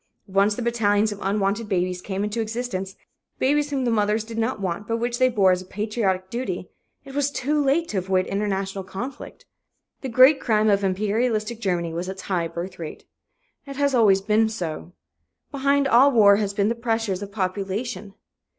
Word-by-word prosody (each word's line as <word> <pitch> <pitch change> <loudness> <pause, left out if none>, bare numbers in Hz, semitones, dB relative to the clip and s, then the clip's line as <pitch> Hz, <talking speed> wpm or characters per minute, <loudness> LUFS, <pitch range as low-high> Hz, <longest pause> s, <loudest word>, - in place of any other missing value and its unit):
Once 200 +2 +2
the 245 - -4
battalions 215 -3 +2
of 205 - -7
unwanted 200 +2 -1
babies 180 -2 -1
came 195 +1 -3
into 210 +2 -2
existence 215 -4 -4 0.4
babies 290 +2 +1
whom 270 -3 -1
the 240 - +1
mothers 210 0 +1
did 225 +1 -9
not 225 -1 -1
want 195 +1 -3
but 230 - 0
which 240 +1 -2
they 255 0 +5
bore 200 -6 +4
as 180 0 0
a - - -11
"patriotic 195 -2 -2
duty" 195 -7 -4 0.3
it 270 - -10
was 285 0 +1
too 285 +2 0
late 295 +5 +2
to 200 - -1
avoid 185 0 0
international 195 -1 -2
conflict. 200 +8 -8 0.6
The 265 - -4
great 260 +4 +6
crime 215 -1 +2
of 200 0 +2
imperialistic 215 +3 0
Germany 175 -5 -1
was 175 +3 -4
its 190 0 -7
high 175 -4 -1
birth 175 +3 -7
rate. 160 -2 -8 0.6
It 275 - -7
has 285 0 +1
always 205 -6 +4
been 215 +2 +2
so. 175 -5 -5 0.6
Behind 280 0 +2
all 270 +3 +6
war 205 -5 +6
has 200 -1 -2
been 200 +1 +2
the - - +1
pressure 225 -3 -1
of 200 +2 -6
population. 200 +2 -3
210 Hz, 185 wpm, -23 LUFS, 190-235 Hz, 0.6 s, great